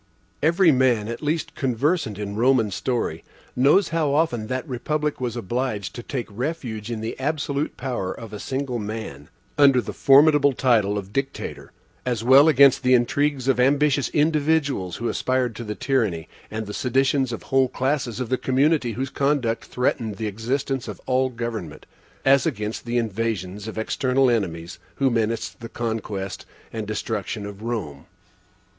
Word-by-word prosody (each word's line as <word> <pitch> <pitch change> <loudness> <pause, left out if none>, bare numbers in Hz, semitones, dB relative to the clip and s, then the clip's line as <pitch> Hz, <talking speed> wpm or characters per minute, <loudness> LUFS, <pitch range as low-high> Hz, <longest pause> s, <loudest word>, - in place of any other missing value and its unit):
Every 170 +3 +4
man 125 -5 +2
the 115 +2 -4
least 155 +1 -1
conversant 135 - 0
in 100 -1 -5
Roman 125 +1 +3
history, 120 +6 -2 0.3
knows 145 +9 +4
how 155 -4 +1
often 125 -9 +1
that 130 +5 -3
republic 150 +3 -2
was 120 -2 -2
obliged 115 -4 -3
to - - -6
take 125 0 -4
refuge 120 -3 -4
in 115 -2 -4
the 110 - -4
absolute 145 0 -2
power 125 -8 -3
of 110 +1 -9
a 105 - -6
single 130 -1 -3
man, 105 -10 -6 0.3
under 140 -3 +6
the - - -4
formidable 145 0 +5
title 110 -6 +2
of 100 0 -6
Dictator, 135 +2 -4 0.3
as 120 -3 -2
well 135 +5 +7
against 140 -3 +6
the 130 -1 +4
intrigues 135 +2 +1
of 135 -2 +2
ambitious 140 +2 +3
individuals 150 - +1
who 120 - -3
aspired 130 -2 0
to 120 - -5
the 105 -1 -5
tyranny, 110 - 0 0.2
and 110 0 -4
the 105 - -7
seditions 135 +1 +1
of 115 - -6
whole 135 -1 +2
classes 130 -3 -1
of 125 -3 -3
the 130 - 0
community 135 -1 +2
whose 130 +4 -3
conduct 135 -5 0
threatened 115 -4 -1
the 110 - -3
existence 125 +5 -2
of - - -7
all 130 0 +2
government, 115 - -6 0.4
as 135 0 +5
against 105 0 -3
the 120 +1 -1
invasions 105 -3 -2
of 110 - -7
external 130 +3 +1
enemies 85 -6 -2 0.2
who 135 -2 +2
menaced 115 0 -1
the 115 - -8
conquest 105 -5 -4 0.3
and 110 -2 -4
destruction 105 -1 -3
of 100 0 -9
Rome. 95 -11 -4
125 Hz, 160 wpm, -23 LUFS, 110-135 Hz, 0.4 s, well